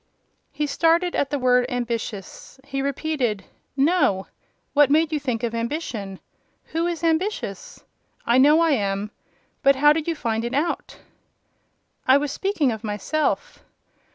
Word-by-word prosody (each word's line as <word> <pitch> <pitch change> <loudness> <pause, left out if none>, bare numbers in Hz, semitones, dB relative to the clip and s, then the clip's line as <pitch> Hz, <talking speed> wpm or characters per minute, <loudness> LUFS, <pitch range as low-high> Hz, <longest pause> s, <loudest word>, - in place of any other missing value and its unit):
He 300 - -2
started 335 +4 +2
at 280 - 0
the 290 - -1
word 250 -1 +3
"ambitious." 235 -2 -5
He 275 0 -4
repeated, 275 -7 -1 0.3
"No. 275 - +2 0.5
What 290 -2 +5
made 315 +2 +3
you 305 - 0
think 250 -5 -3
of 235 -1 -1
ambition? 230 - -4 0.5
Who 330 +1 0
is 340 -2 -4
ambitious? 400 +9 -2 0.4
I 240 +2 +4
know 300 +4 +6
I 330 -1 +3
am: 200 -4 -1 0.5
but 275 -1 +5
how 295 +2 +5
did 315 0 -3
you 335 - 0
find 230 -5 -2
it 240 +2 -3
out?" 315 +4 -2 1.1
"I 260 +1 +7
was 285 -1 -2
speaking 345 -7 0
of 220 0 -6
myself." 220 +9 -2
280 Hz, 145 wpm, -23 LUFS, 235-315 Hz, 1.1 s, I